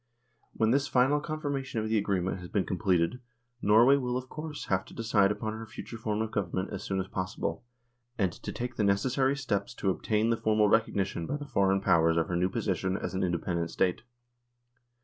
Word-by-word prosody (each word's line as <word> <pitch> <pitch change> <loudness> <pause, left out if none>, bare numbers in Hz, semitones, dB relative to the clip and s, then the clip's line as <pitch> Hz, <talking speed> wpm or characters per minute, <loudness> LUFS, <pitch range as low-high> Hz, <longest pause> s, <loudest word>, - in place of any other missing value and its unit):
When 110 0 +2
this 140 +2 +2
final 135 +3 +3
confirmation 145 -5 -3
of 110 - -2
the 110 0 +2
agreement 95 -2 -1
has 90 -1 -9
been 100 - 0
completed, 95 +2 +1 0.4
Norway 115 +7 +6
will, 125 -2 -1
of 130 0 -6
course, 155 -1 -6
have 95 -1 +1
to - - -14
decide 105 -3 +3
upon 110 +1 -3
her 110 0 -7
future 115 +1 -8
form 110 -1 -1
of 110 - -5
Government 95 -2 -2
as 100 - -4
soon 95 -1 -2
as 95 - -2
possible, 95 +1 -3 0.5
and 95 -4 +1
to - - -7
take 125 0 -5
the 105 - +1
necessary 130 +7 +2
steps 120 -4 -2
to 95 - 0
obtain 110 +4 0
the 115 - +1
formal 110 -1 +3
recognition 100 -6 +1
by 145 - -2
the 145 - -7
Foreign 95 -6 +2
Powers 80 -3 +3
of 85 - +1
her 90 - -1
new 90 +2 +2
position 95 0 -1
as - - -4
an 95 - -1
independent 85 -1 -1
State. 90 +2 0
105 Hz, 200 wpm, -29 LUFS, 95-125 Hz, 0.5 s, Norway